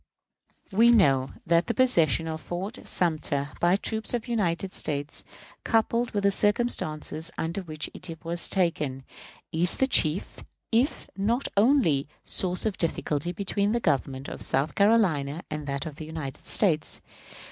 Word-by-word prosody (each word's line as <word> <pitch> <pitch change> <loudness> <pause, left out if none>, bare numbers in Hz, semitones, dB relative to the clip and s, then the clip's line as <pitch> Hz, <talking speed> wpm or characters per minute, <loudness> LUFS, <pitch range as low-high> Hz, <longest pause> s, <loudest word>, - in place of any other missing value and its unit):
We 225 +5 +5
know 135 - +4 0.2
that 170 +1 +3
the 235 - -1
possession 165 - +3
of 160 0 -4
Fort 190 +5 -5
Sumter 150 -4 0
by 175 +2 +4
troops 220 +3 -1
of 235 - -2
the 240 - -7
United 190 -4 0
States, 145 0 -2 0.4
coupled 230 +1 +1
with 205 -1 -2
the 200 - +4
circumstances 165 -7 0
under 170 +4 -2
which 155 -4 -4
it 165 -2 -9
was 170 +1 0
taken, 150 -8 0 0.5
is 170 +2 +2
the 265 - +2
chief, 175 - +1 0.3
if 240 +6 +1
not 230 +7 0
only, 200 - +3 0.2
source 180 +1 0
of 215 -3 -1
difficulty 160 -1 0
between 200 +3 -1
the 235 - +1
government 135 - -1
of - - -7
South 135 +3 0
Carolina 180 -9 +2
and 150 -1 -4
that 140 +1 -3
of 155 -2 -7
the 155 - -6
United 155 -4 -7
States. 160 -7 +1
170 Hz, 150 wpm, -27 LUFS, 155-210 Hz, 0.5 s, We